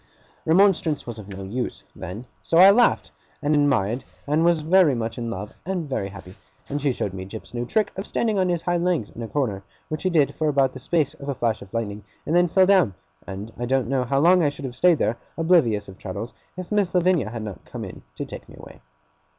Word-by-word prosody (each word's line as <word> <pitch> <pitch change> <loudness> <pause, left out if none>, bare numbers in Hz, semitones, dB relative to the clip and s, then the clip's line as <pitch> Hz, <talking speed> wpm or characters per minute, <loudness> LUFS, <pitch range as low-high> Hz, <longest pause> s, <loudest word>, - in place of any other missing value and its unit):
Remonstrance 170 -3 +3
was 115 -2 -7
of 100 - -10
no 95 -1 -7
use, 120 +6 -4
then; 105 +8 -7 0.2
so 165 - +1
I 190 +3 +10
laughed, 240 - +3 0.3
and 145 +1 +1
admired, 135 -6 +2 0.2
and 150 +3 +2
was 170 -2 +3
very 165 -2 +4
much 115 0 -3
in 115 -1 -3
love 105 0 -6
and 180 -4 -3
very 130 -8 -2
happy; 95 -2 -11 0.3
and 145 +1 -3
she 140 -1 +2
showed 100 -5 -3
me 95 -1 -5
Jip's 105 +5 -9
new 120 0 -3
trick 215 - +1
of 195 +2 -5
standing 220 -4 0
on 185 -1 +2
his 175 -2 -1
hind 175 -1 0
legs 175 - 0
in 120 - -9
a 115 - -4
corner 110 -8 -1 0.3
which 155 0 -3
he 185 - +1
did 155 -6 +3
for 155 -1 0
about 135 -2 +2
the 130 - -8
space 150 +1 0
of 145 -2 -8
a 140 - -1
flash 115 -2 -1
of 95 - -12
lightning, 105 -3 -3 0.2
and 160 - 0
then 175 0 +5
fell 185 +3 +4
down 185 - +4 0.3
and 100 +3 -7
I 120 - -2
don't 130 -2 +1
know 135 -2 +1
how 135 +3 0
long 175 +5 +5
I 150 - +3
should 145 -1 -8
have 125 -2 -6
stayed 175 +1 +4
there, 115 -3 0 0.2
oblivious 160 - +3
of 95 -1 -12
Traddles, 100 +5 -6 0.2
if 185 +1 -7
Miss 200 -4 +1
Lavinia 175 - +3
had 115 -1 -5
not 105 -3 -7
come - - -7
in - - -10
to - - -4
take - - -10
me - - -12
away. - - -13
140 Hz, 240 wpm, -24 LUFS, 110-175 Hz, 0.3 s, I